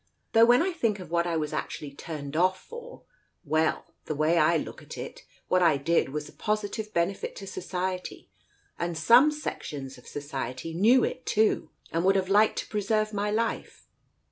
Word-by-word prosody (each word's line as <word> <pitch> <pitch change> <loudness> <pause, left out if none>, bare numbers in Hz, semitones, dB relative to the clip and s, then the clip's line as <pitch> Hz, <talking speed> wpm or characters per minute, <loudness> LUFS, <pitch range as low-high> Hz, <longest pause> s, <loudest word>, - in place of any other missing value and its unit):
Though 225 +1 +7
when 245 +5 +5
I 375 - 0
think 230 -11 0
of 180 - -10
what 170 0 +1
I 170 -1 0
was 150 -1 -2
actually 155 -2 -4
turned 145 0 -7
off 185 +3 +1
ior 480 - -5
l - - -16 0.4
well 155 +1 0
— - - -46
the 155 - -2
way 155 +3 +3
I 165 +2 +4
look - - -6
at - - -10
it, - - -7 0.2
what 185 - +3
I 165 -5 +5
did 165 +1 +1
was 150 +1 -4
a - - -14
positive 215 0 -2
benefit 175 +2 -1
to 195 - -8
Society, 185 -1 -4 0.5
and 170 -1 -2
some 235 - +6
sections 145 - -6
of - - -18
Society 140 +1 -5
knew 230 +9 +5
it, 255 - -3
too, 215 +1 +2 0.2
and 165 +1 0
would 195 +1 +4
have 190 -1 0
liked 210 +2 +4
to - - -3
preserve 215 +1 0
my 205 0 -1
life." 225 +2 -2
180 Hz, 195 wpm, -27 LUFS, 155-215 Hz, 0.5 s, Though